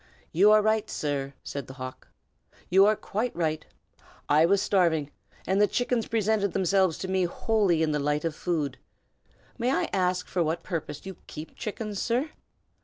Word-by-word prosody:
"You 195 +6 +5
are 215 0 +6
right, 220 0 +1
sir!" 140 -2 -3
said 140 -3 -5
the 130 - -10
hawk. 130 -1 -8 0.6
"You 195 +2 +7
are 215 - +4
quite 220 +4 -3
right! 155 -2 -1 0.6
I 155 +3 +5
was 200 +2 +3
starving, 165 -8 +2 0.3
and 190 +3 +2
the 210 - +6
chickens 245 -1 0
presented 215 -3 +1
themselves 190 -2 +2
to 190 - -5
me 190 -1 +1
wholly 185 -2 +1
in 155 - +1
the 150 - 0
light 150 +2 0
of 165 - -1
food. 150 -6 -2 0.8
May 240 +2 +1
I 265 - +1
ask 180 -1 +1
for 180 - -1
what 165 +1 -1
purpose 155 -3 -5
you 190 -2 -7
keep 155 +1 -9
chickens, 210 -1 -4
sir?" 255 +6 0
185 Hz, 175 wpm, -27 LUFS, 155-210 Hz, 0.8 s, You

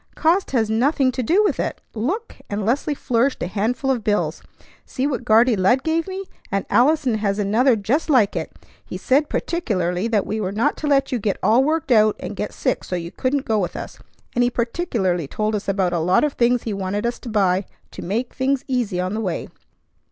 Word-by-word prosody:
"Cost 340 +5 +2
has 230 -5 +1
nothing 255 +4 +2
to 255 - -3
do 350 - +3
with 410 - 0
it. - - -2
Look!" 350 - -3
and 205 0 -2
Leslie 285 +6 0
flourished 255 0 0
a - - 0
handful 225 +8 -1
of 240 -4 -1
bills. 210 0 0 0.4
"See 260 - -3
what 275 -5 -2
Guardy 230 +2 +4
Lud 210 +8 +2
gave 325 +1 0
me! 385 +1 -5 0.3
And 195 0 -1
Allison 255 -3 +3
has 200 -1 0
another 225 +5 +3
just 230 +11 -1
like 245 -9 +3
it. - - -3 0.3
He - - -7
said 285 +3 +2
particularly 190 - -1
that 215 -4 +1
we 215 +1 -3
were 190 -2 -2
not 215 +3 +1
to 305 - -3
let 275 -2 +2
you 250 - 0
get 205 -2 -1
all 240 +4 +4
worked 305 -1 -1
out 215 -2 +5
and - - -6
get - - -3
sick - - -1
so 180 - -4
you 170 -1 -5
couldn't 270 +1 -1
go 220 -1 +1
with 180 - -2
us, - - -7 0.3
and 245 - +2
he 245 - +3
particularly 230 - -1
told 215 +7 -2
us 210 - -3
about 190 -3 +1
a 170 - +1
lot 180 - +3
of 300 -2 +1
things 240 0 +2
he 220 - -3
wanted 200 +2 -2
us 235 - -2
to 240 - -8
buy 195 -3 +2 0.3
to - - -8
make 225 +7 -2
things 265 0 0
easy 240 -9 -1
on 185 +2 -1
the 220 - -2
way. 180 -6 -3
230 Hz, 220 wpm, -21 LUFS, 200-270 Hz, 0.4 s, out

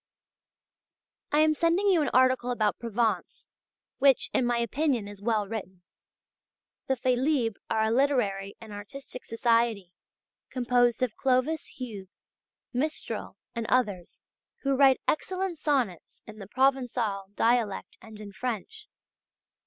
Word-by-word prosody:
I 300 - +4
am 310 0 +4
sending 335 +5 +2
you 355 -4 +4
an 290 - +1
article 255 -1 +3
about 220 -4 0
Provence 230 -1 -2 0.5
which, 275 -2 +4
in 250 - +2
my 240 0 +1
opinion 240 -1 0
is 205 -1 -10
well 215 -2 0
written. 190 -4 -7 1.0
The 265 - +2
"Félibres" 250 -2 +1
are 220 - +1
a 220 - +1
literary 230 -7 +1
and 220 -2 -10
artistic 250 +6 -8
society, 230 -5 +1 0.6
composed 245 -1 +2
of 240 -4 -1
Clovis 270 +4 0
Hugues, 210 -7 -7 0.6
Mistral, 300 +5 -3 0.2
and 230 -1 -3
others, 205 -9 0 0.4
who 275 -1 +2
write 270 -1 +5
excellent 370 +1 -1
sonnets 260 - -1
in 215 0 -11
the 195 - -8
Provençal 240 -6 0
dialect 230 -3 0
and 220 -1 -12
in 205 -1 -8
French. 250 - -5
240 Hz, 125 wpm, -28 LUFS, 215-270 Hz, 1.0 s, write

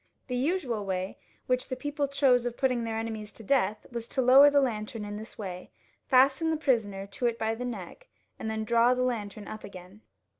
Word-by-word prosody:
The 250 - -1
usual 260 - -1
way 190 -1 -3 0.3
which 255 0 0
the 255 - -2
people 290 +2 -2
chose 265 -3 +3
of 240 - -5
putting 255 -3 +1
their 225 -1 -3
enemies 220 -2 -4
to 225 - -11
death 215 -3 +1
was 235 -1 -5
to 265 - 0
lower 270 +4 +8
the 285 0 +4
lantern 220 -4 -2
in 205 0 -5
this 220 +2 -9
way, 185 -4 -6 0.4
fasten 270 +5 +4
the 320 - +1
prisoner 215 -9 0
to 240 +5 -2
it 230 -1 -1
by 220 0 0
the 245 +2 -5
neck, 240 - -7 0.3
and 220 - -3
then 220 0 -2
draw 235 +3 +4
the 250 - 0
lantern 215 -4 -3
up 215 - -8
again. 185 +2 -11
235 Hz, 210 wpm, -28 LUFS, 215-260 Hz, 0.4 s, lower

